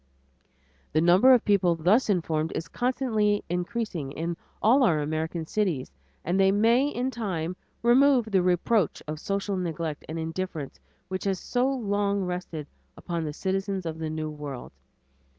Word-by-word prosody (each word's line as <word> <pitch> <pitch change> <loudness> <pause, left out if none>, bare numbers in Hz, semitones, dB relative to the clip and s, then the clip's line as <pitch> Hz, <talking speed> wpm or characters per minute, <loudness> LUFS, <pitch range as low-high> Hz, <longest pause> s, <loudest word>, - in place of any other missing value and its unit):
The 155 - +3
number 180 +10 +6
of 250 -3 +5
people 190 -5 +3
thus 190 +10 +3
informed 160 -4 0
is 165 - -3
constantly 225 -5 0
increasing 180 - -3
in 165 +3 -3 0.2
all 245 +7 +4
our 170 -11 +4
American 160 +2 -2
cities, 170 - -1 0.3
and 180 +3 +1
they 190 0 +5
may 230 +7 +4
in 260 -2 -2
time 180 -8 -3 0.3
remove 255 +1 +5
the 190 -2 +4
reproach 180 +2 +1
of 155 0 -4
social 200 +2 -2
neglect 165 -4 -3
and 160 - -4
indifference 165 -2 -4 0.3
which 185 +1 -4
has 190 -2 0
so 250 +1 0
long 205 -5 0
rested 180 -4 -4 0.3
upon 170 -2 -3
the 150 - -3
citizens 195 +2 -2
of 160 -1 -4
the 160 -1 -3
new 155 0 -3
world. 145 -4 -7
185 Hz, 150 wpm, -27 LUFS, 160-215 Hz, 0.3 s, number